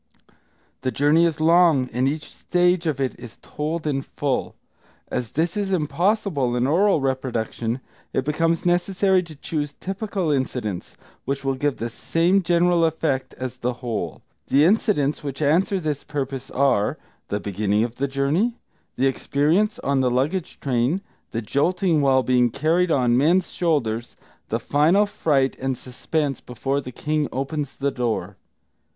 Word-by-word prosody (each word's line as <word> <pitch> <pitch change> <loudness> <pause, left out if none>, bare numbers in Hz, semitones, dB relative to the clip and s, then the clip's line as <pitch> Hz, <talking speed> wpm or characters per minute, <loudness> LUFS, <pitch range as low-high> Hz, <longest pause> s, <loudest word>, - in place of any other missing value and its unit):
The 130 - 0
journey 145 +7 +4
is 160 -2 -3
long, 165 -4 +4
and 125 +3 +1
each 150 +3 -2
stage 180 -1 +1
of 145 -4 -1
it 130 -2 -2
is 120 -2 -11
told 155 +2 -4
in 140 -3 0
full. 135 -1 -2 0.5
As 120 -3 -3
this 165 +3 0
is 200 -2 -1
impossible 170 - +1
in 125 0 +1
oral 180 +6 +3
reproduction, 125 -2 -2 0.3
it 130 - -1
becomes 165 +3 0
necessary 185 +2 +2
to 165 -3 -11
choose 145 0 -3
typical 195 -3 -2
incidents, 125 -9 -3 0.3
which 135 +1 -2
will 135 - +2
give 140 +1 -1
the 115 - -3
same 170 - +1
general 175 0 +3
effect 155 -4 0
as 130 0 -5
the 125 0 -1
whole. 105 - -3 0.2
The 145 +3 +4
incidents 175 - +2
which 140 -2 -5
answer 170 +6 +2
this 150 -4 -3
purpose 135 -2 -4
are: 130 -6 +2 0.3
the 105 - -2
beginning 105 +1 0
of 120 0 -4
the 140 - 0
journey, 150 - 0 0.4
the 130 - +1
experience 155 - +1
on 140 -1 0
the 130 -1 +2
luggage 150 +9 -1
train, 130 +7 0 0.3
the 115 0 -3
jolting 165 - +1
while 135 -2 +4
being 125 -1 +3
carried 165 +8 +1
on 125 -6 +3
men's 170 +7 +3
shoulders, 120 -9 -1 0.3
the - - 0
final 165 +8 +3
fright 140 -9 +1
and 130 -1 -1
suspense 135 +3 -3
before 135 +3 -2
the 125 - -8
king 150 +3 -1
opens 140 +1 -3
the 140 0 -1
door. 115 -7 -2
145 Hz, 155 wpm, -23 LUFS, 130-170 Hz, 0.5 s, journey